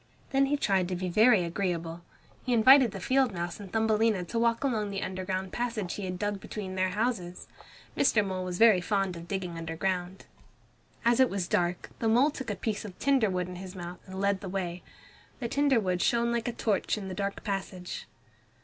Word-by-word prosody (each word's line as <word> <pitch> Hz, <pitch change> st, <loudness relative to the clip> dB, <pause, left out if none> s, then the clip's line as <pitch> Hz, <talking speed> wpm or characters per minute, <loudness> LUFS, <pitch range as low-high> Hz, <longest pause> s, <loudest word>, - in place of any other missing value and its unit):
Then 275 Hz, 0 st, +3 dB
he 290 Hz, +1 st, +1 dB
tried 195 Hz, -8 st, +1 dB
to 185 Hz, -, -2 dB
be 180 Hz, +1 st, -3 dB
very 215 Hz, +1 st, +5 dB
agreeable. 170 Hz, -1 st, -3 dB, 0.4 s
He 250 Hz, -, 0 dB
invited 255 Hz, +2 st, +7 dB
the 195 Hz, -, -7 dB
field 260 Hz, +5 st, +2 dB
mouse 175 Hz, 0 st, -4 dB
and 200 Hz, -3 st, -9 dB
Thumbelina 220 Hz, -3 st, +2 dB
to 230 Hz, +7 st, -3 dB
walk 230 Hz, +1 st, +2 dB
along 220 Hz, -6 st, 0 dB
the 195 Hz, -1 st, -3 dB
underground 185 Hz, 0 st, -3 dB
passage 230 Hz, -6 st, -2 dB
he 205 Hz, -, -5 dB
had 180 Hz, -1 st, -4 dB
dug 205 Hz, +1 st, -2 dB
between 190 Hz, -1 st, -6 dB
their 185 Hz, 0 st, +1 dB
houses. 200 Hz, -4 st, -2 dB, 0.5 s
Mr. 215 Hz, -6 st, +3 dB
Mole 185 Hz, -1 st, -3 dB
was 180 Hz, -1 st, -4 dB
very 220 Hz, -4 st, +6 dB
fond 195 Hz, -1 st, 0 dB
of 170 Hz, 0 st, -9 dB
digging 180 Hz, -4 st, -4 dB
underground. 180 Hz, +3 st, -3 dB, 0.8 s
As 235 Hz, +1 st, +4 dB
it 260 Hz, -, +5 dB
was 190 Hz, -3 st, -2 dB
dark 175 Hz, 0 st, -1 dB
the 225 Hz, -, 0 dB
mole 250 Hz, +7 st, +4 dB
took 265 Hz, -4 st, -6 dB
a 205 Hz, -, -1 dB
piece 205 Hz, +2 st, -3 dB
of 195 Hz, -4 st, -9 dB
tinder 265 Hz, -6 st, +3 dB
wood 180 Hz, -1 st, -1 dB
in 180 Hz, -1 st, -7 dB
his 185 Hz, +1 st, -8 dB
mouth 175 Hz, 0 st, -7 dB
and 190 Hz, 0 st, -7 dB
led 200 Hz, -1 st, +1 dB
the 195 Hz, -, -6 dB
way. 180 Hz, -2 st, -3 dB, 0.6 s
The 240 Hz, -, -2 dB
tinder 280 Hz, 0 st, +3 dB
wood 185 Hz, -3 st, -1 dB
shone 235 Hz, 0 st, +2 dB
like 235 Hz, 0 st, -1 dB
a -, -, 0 dB
torch 215 Hz, -3 st, 0 dB
in 200 Hz, -2 st, -6 dB
the 190 Hz, -, -5 dB
dark 200 Hz, +2 st, -3 dB
passage. 190 Hz, -3 st, -4 dB
195 Hz, 205 wpm, -29 LUFS, 180-230 Hz, 0.8 s, invited